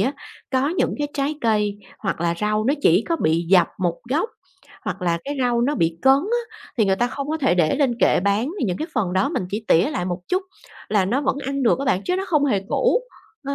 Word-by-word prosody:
á, 270 - +1 0.4
có 265 +2 +1
những 345 - 0
cái 290 0 -1
trái 280 +2 -1
cây 210 -3 +1 0.2
hoặc 190 -5 -3
là 170 0 +1
rau 215 0 0
nó 275 +5 +2
chỉ 175 +6 +5
có 335 - +1
bị 165 - +1
dập 180 -2 +5
một 175 -3 -1
gốc, 325 - +1 0.6
hoặc - - -4
là 170 -1 +1
cái 285 +1 -3
rau 245 -2 +2
nó 290 +4 +1
bị 165 0 0
cấn 265 - +7
á, 465 +7 -3 0.2
thì 220 - +5
người 190 -1 +2
ta 240 - +1
không 280 +3 -5
có 315 +1 -1
thể 265 - +2
để 165 -4 +2
lên 270 -4 +2
kệ - - +3
bán 200 +7 +1
thì - - 0
những 180 -5 -1
cái 315 - -4
phần 195 -6 0
đó 190 +1 +2
mình - - -2
chỉ 215 +2 -3
tỉa 175 - +4
lại 180 - -2
một 180 0 -3
chút 370 +2 +1 0.5
là 205 -3 +2
nó 240 +9 0
vẫn 270 -1 0
ăn 275 0 -2
được 235 - +3
á 275 - -2
bạn, 190 -6 +1
chứ 360 - 0
nó 385 - -2
không 300 -4 +3
hề 210 -8 +1
cũ, 475 - +2 0.4
ờ. 280 - -2
235 Hz, 255 wpm, -22 LUFS, 185-280 Hz, 0.6 s, cấn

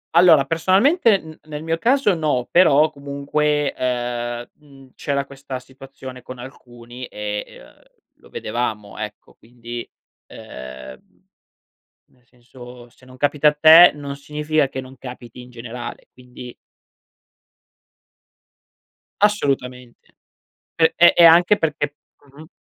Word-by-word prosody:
Allora 165 -5 +6
personalmente 200 - +3
n 160 -3 -13
nel 150 0 -7
mio 165 0 -2
caso 250 -2 +2
no, 150 -7 -1
però 155 -3 +4
comunque, 145 +1 -2
ehm, 120 -1 -3
mhmm, 140 -3 -19
c'era 140 -1 -3
questa 135 -1 -8
situazione 130 0 -12
con 130 0 -10
alcuni 120 -1 -11
e 105 0 -5
e, - - -15
uhm, - - -24 0.4
lo - - -21
vedevamo 110 -4 -5
ecco, - - -8
quindi 120 0 -10 0.4
ehm, 65 0 -11 1.1
nel 125 -1 -31
senso 120 0 -15
se 130 - -23
non 130 0 -15
capita 145 +2 +2
a 150 - +1
te 160 +3 +8
non 140 -1 -7
significa 150 0 -1
che 130 - -6
non 130 0 -14
capiti 125 -1 -11
in 125 - -13
generale, 120 0 -9
quindi 125 -1 -12 2.7
Assolutamente. 130 - -2 0.6
P 160 -1 +3
e 170 +1 +7
e 170 - +6
anche 175 +5 +6
perché 145 -3 -2 0.4
mh-mh. 155 +1 -13
135 Hz, 120 wpm, -20 LUFS, 125-155 Hz, 2.7 s, te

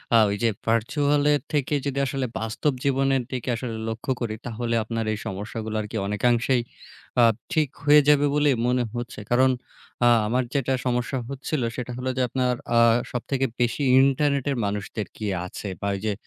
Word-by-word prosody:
আ - - +8
ওই 100 - -1
যে 115 - +4 0.2
ভার্চুয়ালের 145 +6 +2
থেকে 145 0 0
যদি 140 0 -1
আসলে 135 -1 -2
বাস্তব 115 +6 -1
জীবনের 135 -1 +2
দিকে 125 -1 -3
আসলে 115 -1 -4
লক্ষ্য 115 +4 -3
করি 110 -2 -2
তাহলে 120 0 -2
আপনার 115 +1 -3
এই - - -3
সমস্যাগুলো 110 +3 -5
আর 105 - -5
কি 110 - -3
অনেকাংশেই 120 +4 +2 0.6
আ - - +7 0.3
ঠিক 155 -3 +2
হয়ে 150 +1 +7
যাবে 145 0 +5
বলে 145 0 +3 0.2
মনে 125 0 +2
হচ্ছে। 120 -1 -5
কারণ 130 +2 +5 0.6
আ - - +7 0.2
আমার 125 +4 +1
যেটা 135 -1 +1
সমস্যা 125 +2 0
হচ্ছিল 140 +1 -3
সেটা 125 0 -5
হলো 130 +1 -2
যে 130 - +2
আপনার 125 0 0 0.2
আ - - +7 0.3
সবথেকে 130 +2 -1 0.2
বেশি 120 +4 0 0.2
ইন্টারনেটের 140 0 +2
মানুষদের 100 +1 -3
কি 110 - -4 0.2
আছে 90 - -7
বা 100 - -1
ওই 95 - -5
যে 105 - +1
125 Hz, 175 wpm, -24 LUFS, 115-140 Hz, 0.6 s, আ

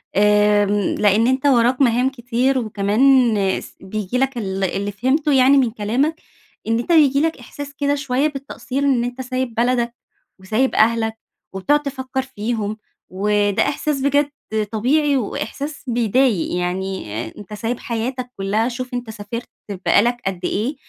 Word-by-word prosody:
آمم 205 0 +3
لأن 210 +3 +3
أنت 260 +2 0
وراك 250 0 +3
مهام 250 +1 +3
كتير، 255 +1 0
وكمان 225 +3 +3 0.3
س - - -13
بييجي 210 +4 -3
لك 270 -1 0
ال 195 -3 -3
اللي 200 +2 -1
فهمته 270 +8 +1
يعني 265 +1 +5
من 245 -4 +3
كلامك، 245 +9 0 0.5
إن 225 +1 +1
أنت 245 - -3
بييجي 285 -4 +5
لك 325 -1 0
إحساس 285 +3 -9
كده 285 0 +1
شوية 275 0 0
بالتقصير 275 -1 -5
إن 260 -4 +2
أنت 245 +2 -4
سايب 255 -2 -3
بلدك 240 0 +1 0.5
وسايب 220 +8 0
أهلك 225 0 +2 0.4
وبتقعد 285 +11 +2
تفكر 265 -1 -3
فيهم، 220 -4 -3 0.3
وده 205 +1 +1
إحساس 285 -1 -1
بجد 285 +1 +2 0.4
طبيعي 280 +6 +2
وإحساس 275 +6 -4
بيضايق، 235 -5 +1
يعني 190 +2 -2 0.3
أنت 205 0 -10
سايب 225 +3 -3
حياتك 245 +2 -4
كلها 210 +4 0
شوف 255 +1 -6
أنت 245 -2 -4
سافرت 220 +3 -6 0.4
بقى 200 - +5
لك 240 +1 +1
قد 190 -2 -2
إيه، 235 +9 -1
240 Hz, 145 wpm, -20 LUFS, 210-270 Hz, 0.5 s, يعني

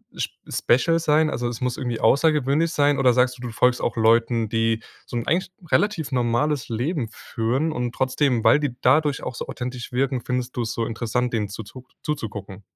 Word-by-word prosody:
sp - - -4
special 165 +8 +2
sein, 155 0 +3
also, 120 -3 -2
es 120 - -6
muss 125 -1 -1
irgendwie 120 -4 -3
außergewöhnlich 150 +4 +3
sein? 145 -2 +2
Oder 130 -2 +5
sagst 125 +1 +2
du, - - -13
du 125 -2 -5
folgst 125 +4 +2
auch - - -2
Leuten, 115 0 +3
die 115 0 +1 0.2
so 120 - -5
'n 115 - -3
eigentlich 175 +2 0 0.2
relativ 190 -9 +1
normales 125 +3 0
Leben 120 +1 -2
führen 125 +9 -2
und 120 -1 -3
trotzdem, 130 -2 +1
weil 150 - +6
die 145 -5 -2
dadurch 150 -2 +3
auch 125 - -4
so - - -5
authentisch 125 -1 -6
wirken, 130 0 0
findest 125 0 -2
du's 120 -1 -2
so 115 - -1
interessant, 120 +2 -2
denen 105 -3 -1
zuzuck 115 +5 -9 0.2
zuzugucken? 105 - -5
125 Hz, 190 wpm, -23 LUFS, 115-145 Hz, 0.2 s, weil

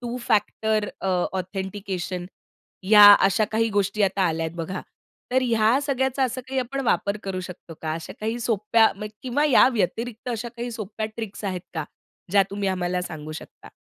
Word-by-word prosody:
Two 240 0 -4
factor 215 0 +1
अ, 190 - -2 0.3
authentication 190 -1 -4 0.6
या 210 -1 +10 0.2
अशा 200 +3 +3
काही 225 +1 +2
गोष्टी 205 +1 0
आता 195 0 +2
आल्यात 160 0 -2
बघा. 175 +3 -4 0.5
तर 260 0 +3
ह्या 230 +1 +3
सगळ्याचा 265 -1 0
असा 255 +1 -3
काही 265 - -2
आपण 270 +3 -3
वापर 200 -1 +1
करू 190 -1 -3
शकतो 180 -2 -9
का? 155 -1 -2
अशा 165 0 -7
काही 225 +2 -2
सोप्या 220 0 +3 0.4
किंवा 260 +3 0
मग 300 - +2
या 250 - +7
व्यतिरिक्त 230 +3 -2
अशा 240 0 -3
काही 240 +1 -4
सोप्या 215 -1 -4
ट्रिक्स 220 -2 -6
आहेत 185 -3 -2
का? 160 -2 -2 0.5
ज्या 200 0 +5
तुम्ही 200 0 -2
आम्हाला 180 -1 -1
सांगू 155 -3 -7
शकता? 155 - -11
210 Hz, 170 wpm, -24 LUFS, 185-235 Hz, 0.6 s, या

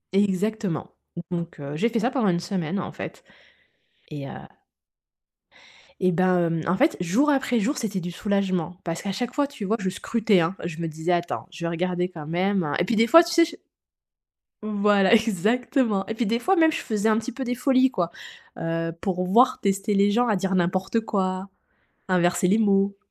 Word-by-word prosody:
Exactement, 200 -2 -1 0.4
donc 170 -2 -4
heu, 140 +1 -6
j'ai 230 +10 +1
fait 230 - -1
ça 240 +4 0
pendant 255 -7 +1
une 170 -1 +1
semaine, 175 0 -3
en 180 - -5
fait, - - -8 0.9
et 145 -2 -7
heu - - -8 1.7
eh 185 -1 +2
ben, 185 +1 +2
hem, 165 -1 -1
en 170 - +2
fait, 300 +7 +2
jour 205 - +2
après 265 -4 +1
jour, 255 +8 -1
c'était 210 -5 -2
du 175 0 -5
soulagement, 185 -3 -1
parce 165 -1 -4
qu'à 200 - -3
chaque 245 +5 -3
fois, 290 0 +1
tu 275 -7 -7
vois? 220 +4 0
Je 190 -2 -1
scrutais, 210 +1 +1
hein, 165 +2 0
je 165 -1 -5
me 170 - -2
disais: 160 +2 -3
«Attends, 175 +1 -2
je 170 0 -7
vais - - 0
regarder, 180 +1 -1
quand 160 -5 -9
même.» 180 -1 0
et - - +2
puis, 230 - 0
des 225 +2 +3
fois, 330 +6 +8
tu 340 - -5
sais, 335 0 +5
je 330 - -9 1.1
Voilà, 205 -1 +3
exactement. 225 - +1
Et 225 - -3
puis 230 +1 -1
des 230 +3 0
fois, 380 +9 +2
même, 320 -2 +4
je - - -3
faisais 215 0 0
un 215 - +3
petit 225 - -6
peu 265 +2 -5
des 245 -1 -2
folies, 260 +1 +3
quoi. 175 -6 -2 0.5
Heu, 165 0 -2
pour 180 -2 -1
voir, 245 +7 +4
tester 195 +1 0
les 200 0 +3
gens 240 +4 +2
à 210 - +2
dire 190 +1 -1
n'importe 185 +5 0
quoi, 190 -3 -2 0.6
inverser 180 -1 +2
les 200 +4 +3
mots. 200 -2 +2
195 Hz, 200 wpm, -24 LUFS, 175-230 Hz, 1.7 s, fois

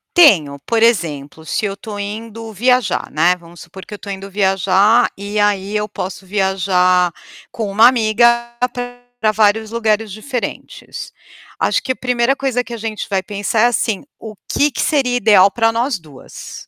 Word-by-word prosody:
Tenho, 160 - +5
por 230 -1 +1
exemplo, 160 -9 0
se 215 - -2
eu 200 - -2
estou 205 +1 -8
indo 220 +2 -6
viajar, 250 +4 +1
né, 170 +4 +3
vamos 170 0 -15
supor 190 - -12
que - - -11
eu - - -4
estou 205 0 -8
indo 195 0 -7
viajar, 195 +3 +3
e 205 +2 -4
aí 205 -1 +1
eu 210 0 -1
posso 195 -1 -6
viajar 185 -2 +1 0.4
com 215 -4 -4
uma 220 +4 +6
amiga 235 0 +2 0.7
pra 215 - +3
vários 215 +1 +2
lugares 220 -2 0
diferentes. 235 +4 -6 0.4
Acho - - +1
que 260 - -1
a - - -19
primeira 250 +1 0
coisa 265 -3 -1
que 240 - -9
a - - -5
gente 220 -1 -5
vai 195 -2 0
pensar 205 +3 -1
é - - +5
assim: 225 -4 -1 0.2
"O 220 -1 -9
que 290 - +2
que 250 - -4
seria 270 -5 +1
ideal 205 -5 +5
para 225 +2 +1
nós 235 +1 -1
2?". 150 -6 -12
210 Hz, 175 wpm, -17 LUFS, 190-235 Hz, 0.7 s, uma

